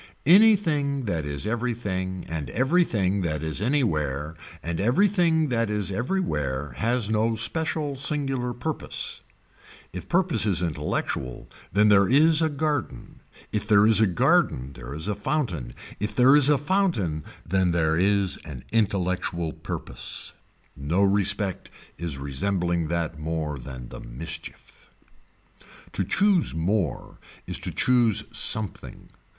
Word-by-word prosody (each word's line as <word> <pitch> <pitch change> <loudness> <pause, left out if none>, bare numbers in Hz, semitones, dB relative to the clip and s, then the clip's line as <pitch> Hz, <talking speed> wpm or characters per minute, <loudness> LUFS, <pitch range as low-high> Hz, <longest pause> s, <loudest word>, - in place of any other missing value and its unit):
Anything 160 - +4
that 80 -7 -2
is 70 +3 -3
everything 105 -6 -3
and 80 -3 -4
everything 120 - +1
that 75 -3 -2
is 80 +3 -3
anywhere 80 - 0 0.3
and 85 0 -3
everything 160 - +2
that 115 -3 0
is 105 -2 -1
everywhere 75 - -2
has 115 - 0
no 110 +1 +1
special 150 +4 0
singular 135 -3 -1
purpose. 130 +6 -5 0.7
If 90 0 -8
purpose 175 - +2
is 90 -3 +2
intellectual 75 -5 -3 0.2
then 105 +2 +4
there 100 -2 +5
is 155 +4 +5
a 160 - +2
garden, 145 -2 -3 0.3
if 105 0 -2
there 105 -1 +5
is 110 0 +5
a 110 - +5
garden 70 -6 +1
there 65 +2 -8
is 80 +4 -5
a 105 - 0
fountain, 100 - -3 0.2
if 105 +2 -3
there 130 +3 +6
is 145 -1 +5
a 145 - +5
fountain 140 - 0 0.2
then 95 +1 +2
there 80 -2 +1
is 100 +1 +2
an 65 -6 -10
intellectual 95 -6 -1
purpose. - - -5 0.4
No 80 +8 0
respect 100 0 +1 0.3
is 85 -5 -3
resembling 85 +5 -1
that 80 -1 -2
more 75 -2 -3
than 65 -1 -9
the - - -9
mischief. 80 +7 -8 1.0
To - - -1
choose 185 - +2
more 85 - -2 0.3
is - - -2
to - - -3
choose 120 -5 +4
something. 110 -3 0
100 Hz, 130 wpm, -25 LUFS, 80-130 Hz, 1.0 s, there